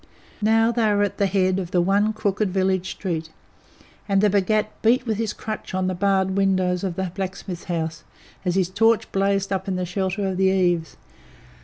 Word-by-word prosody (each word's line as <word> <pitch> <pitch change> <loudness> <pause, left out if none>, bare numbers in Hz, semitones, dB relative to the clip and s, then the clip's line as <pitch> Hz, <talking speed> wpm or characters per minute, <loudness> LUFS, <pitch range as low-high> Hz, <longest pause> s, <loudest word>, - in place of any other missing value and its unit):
Now 225 +2 +3
they 225 -2 +2
were 205 - +3
at 200 - -2
the 200 - +3
head 185 -1 +1
of 180 -3 -4
the 180 - +1
one 200 +4 +2
crooked 210 -1 -1
village 190 0 0
street, 165 -4 -4 0.8
and 195 -1 +3
the 205 0 +3
Bhagat 210 +2 +1
beat 245 +3 +3
with 220 -3 -1
his 225 -2 -1
crutch 215 -3 -6
on 185 0 0
the 185 - 0
barred 190 0 +1
windows 185 -2 +1
of 185 -3 -2
the 190 -1 -3
blacksmith's 185 -2 -5
house, 165 -2 -3 0.4
as 180 -2 0
his 185 -2 +1
torch 225 +3 +2
blazed 195 0 +1
up 190 0 -3
in 190 - -1
the 180 0 -2
shelter 190 +2 -2
of 190 -1 -2
the 190 - +2
eaves. 175 -4 +1
190 Hz, 195 wpm, -23 LUFS, 185-205 Hz, 0.8 s, Now